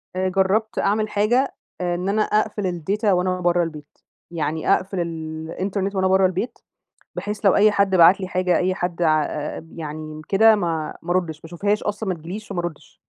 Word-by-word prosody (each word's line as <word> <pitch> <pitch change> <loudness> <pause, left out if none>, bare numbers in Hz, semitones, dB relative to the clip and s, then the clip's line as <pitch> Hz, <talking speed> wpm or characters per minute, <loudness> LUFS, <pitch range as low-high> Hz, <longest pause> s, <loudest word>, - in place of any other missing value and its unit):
آآ، 185 0 0
جربت 195 +4 +1
أعمل 215 +2 +1
حاجة، 235 +7 +1 0.3
آآ 175 -1 0
إن 180 +2 -2
أنا 215 +2 +2
أقفل 210 -1 0 0.2
الData 205 +7 -2
وأنا 185 -1 +2
بره 175 0 +2
البيت. 150 -3 -8 0.3
يعني 160 +2 0
أقفل 190 -1 -1
ال 160 -1 -5
الإنترنت 195 +2 -2
وأنا 190 0 +2
بره 190 0 +4
البيت 185 +6 -2 0.6
بحيث 210 0 -4
لو 195 - +5
أي 210 +1 +6
حد 200 -1 +2
بعت 175 +3 +7
لي 185 - -4
حاجة، 180 -2 +1
أي 185 +1 +1
حد 175 -2 -3
ع 155 -2 +4
آآ، 150 +2 -5
يعني 155 -1 -7
كده 220 +2 +6
ما 165 -5 -2
ما 170 - -7
أردش 175 -4 0
ما 155 - -27
أشوفهاش 200 +5 -1
أصلًا، 210 0 -3
ما 185 - 0
تجيليش 180 +6 -8
فما 190 -3 -2
أردش. 175 -3 -8
185 Hz, 190 wpm, -22 LUFS, 165-200 Hz, 0.6 s, بعت